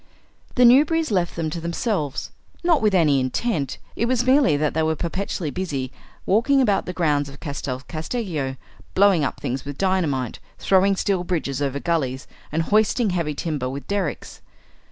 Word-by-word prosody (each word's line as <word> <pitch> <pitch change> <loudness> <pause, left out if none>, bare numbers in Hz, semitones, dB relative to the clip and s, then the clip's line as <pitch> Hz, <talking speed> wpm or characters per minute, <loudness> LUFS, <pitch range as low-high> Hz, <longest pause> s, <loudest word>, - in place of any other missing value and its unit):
The 250 - +5
Newberrys 295 +5 +5
left 180 -4 0
them 160 -2 -2
to 170 - -4
themselves; 170 - -2 0.3
not 340 -3 +3
with 210 -3 +3
any 150 -6 +4
intent; 140 - -1 0.2
it 230 - 0
was 245 -1 +1
merely 260 - +4
that 150 0 0
they 160 - +1
were 160 0 +1
perpetually 170 -1 -3
busy 140 -8 -3 0.3
walking 245 +8 +3
about 210 -7 +2
the - - -2
grounds 150 -5 0
of 140 - -12
Castel 140 -3 -5
Casteggio, 155 - -3 0.4
blowing 195 -5 +5
up - - -2
things 130 +2 -3
with 145 0 -7
dynamite, 160 - 0 0.2
throwing 195 +1 +3
steel 190 -1 0
bridges 155 -7 -2
over 140 0 -1
gullies, 135 -6 -1 0.3
and 160 +2 0
hoisting 215 +3 +2
heavy 165 -4 -1
timber 145 -5 -2
with 135 0 -7
derricks. 200 -6 -3
170 Hz, 165 wpm, -23 LUFS, 145-200 Hz, 0.4 s, The